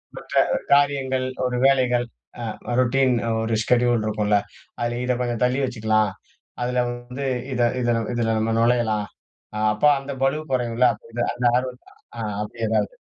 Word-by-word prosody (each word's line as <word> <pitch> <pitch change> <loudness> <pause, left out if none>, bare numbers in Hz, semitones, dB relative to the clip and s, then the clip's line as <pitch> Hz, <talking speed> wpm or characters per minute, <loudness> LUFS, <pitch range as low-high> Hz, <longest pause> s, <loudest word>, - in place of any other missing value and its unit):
மற்ற - - -10 0.4
காரியங்கள், 135 -2 +3 0.2
ஒரு 125 -1 -1
வேலைகள், 125 -3 +3 0.4
அ - - -4 0.4
ரொட்டின் 130 0 +3 0.3
ஒரு 110 0 0
ஷெட்யூல் 120 -2 +2
இருக்குல்ல. 105 -1 +1 0.4
அதில 120 0 -1
இத 125 -1 +1
கொஞ்சம் 120 -1 -2
தள்ளி 125 +2 +2
வச்சுக்கலாம். 110 -4 +1 0.5
அதில 125 0 +1
வந்து 125 +3 -6 0.3
இத, 120 - -1 0.2
இதுல, 120 -1 +1 0.2
இதில 115 -1 0
நம்ம 110 +1 0
நுழையலாம். 115 -3 +2 0.7
அப்ப 105 - -10 0.2
அந்த 140 +1 -7
பளுவு 150 +3 +1
குறையும்ல, 125 -1 +1
அப்பிடின்னு 115 +2 -4
அந்த 120 0 -3
ஆர்வத்த 125 0 -4 0.4
அ - - -3 0.2
அப்பிடி 110 +2 -4
ஏதாவது. - - 0
120 Hz, 140 wpm, -23 LUFS, 115-130 Hz, 0.7 s, காரியங்கள்